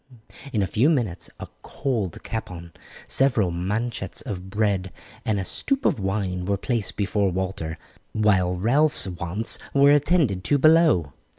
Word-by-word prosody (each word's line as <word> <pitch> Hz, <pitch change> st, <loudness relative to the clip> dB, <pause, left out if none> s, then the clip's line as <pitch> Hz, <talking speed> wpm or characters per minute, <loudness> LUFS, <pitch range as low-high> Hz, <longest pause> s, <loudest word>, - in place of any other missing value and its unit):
In 105 Hz, -5 st, +1 dB
a -, -, +1 dB
few 115 Hz, -, +2 dB
minutes 115 Hz, -, -1 dB
a -, -, -7 dB
cold 110 Hz, -, -3 dB
capon, 90 Hz, -7 st, -6 dB, 0.4 s
several 120 Hz, -9 st, +3 dB
manchets 100 Hz, +3 st, -3 dB
of 95 Hz, -2 st, -6 dB
bread, 100 Hz, -3 st, 0 dB, 0.3 s
and 105 Hz, -2 st, 0 dB
a 95 Hz, -, -3 dB
stoop 275 Hz, -, -1 dB
of -, -, +2 dB
wine 95 Hz, -2 st, -2 dB
were 100 Hz, +1 st, 0 dB
placed 105 Hz, -3 st, -2 dB
before 100 Hz, -1 st, 0 dB
Walter, 90 Hz, -3 st, -3 dB, 0.3 s
while 95 Hz, -4 st, +2 dB
Ralph's 135 Hz, +9 st, +2 dB
wants 90 Hz, +4 st, 0 dB, 0.2 s
were 140 Hz, +1 st, +6 dB
attended 145 Hz, -, +2 dB
to 145 Hz, -, +3 dB
below. 155 Hz, -, +4 dB
100 Hz, 140 wpm, -24 LUFS, 90-120 Hz, 0.4 s, were